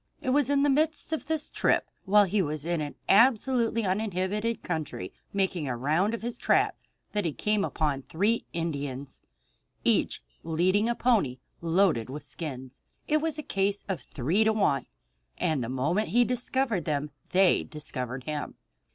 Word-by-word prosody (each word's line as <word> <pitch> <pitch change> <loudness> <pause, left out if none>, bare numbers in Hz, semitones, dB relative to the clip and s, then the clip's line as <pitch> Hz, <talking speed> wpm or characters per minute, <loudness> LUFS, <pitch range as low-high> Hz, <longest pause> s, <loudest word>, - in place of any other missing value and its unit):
It 260 -4 -1
was 280 -1 +3
in 280 -1 +3
the 290 - +4
midst 310 +2 +1
of 315 - -3
this 315 -1 -1
trip, - - +2 0.2
while 205 +1 +6
he 195 +2 +1
was 155 -2 -3
in 170 -2 0
an 145 -1 -5
absolutely 230 0 +4
uninhabited 205 +3 -1
country, 155 - -4 0.2
making 190 -6 0
a 125 -2 -2
round 160 - +1
of 230 - -9
his 240 0 -4
traps, - - +2 0.3
that 210 - 0
he 165 - 0
came 210 +4 0
upon 150 -7 -1
three 205 - 0
Indians, 140 -5 -4 0.6
each - - +1 0.2
leading 185 +7 +2
a 235 - +1
pony 215 - +2 0.2
loaded 165 - +2
with 145 +3 -6
skins. 130 -5 -7 0.3
It 305 - +3
was 315 0 -1
a 305 - -4
case 195 -2 -1
of 190 -3 -2
three 160 - 0
to 220 0 +3
one, 195 -10 +1 0.5
and 150 -6 0
the 115 - -4
moment 155 +12 0
he 240 +2 +4
discovered 245 - 0
them 150 -1 -1 0.2
they 190 0 +4
discovered 130 -4 -5
him. 150 +1 -4
190 Hz, 165 wpm, -28 LUFS, 150-230 Hz, 0.6 s, while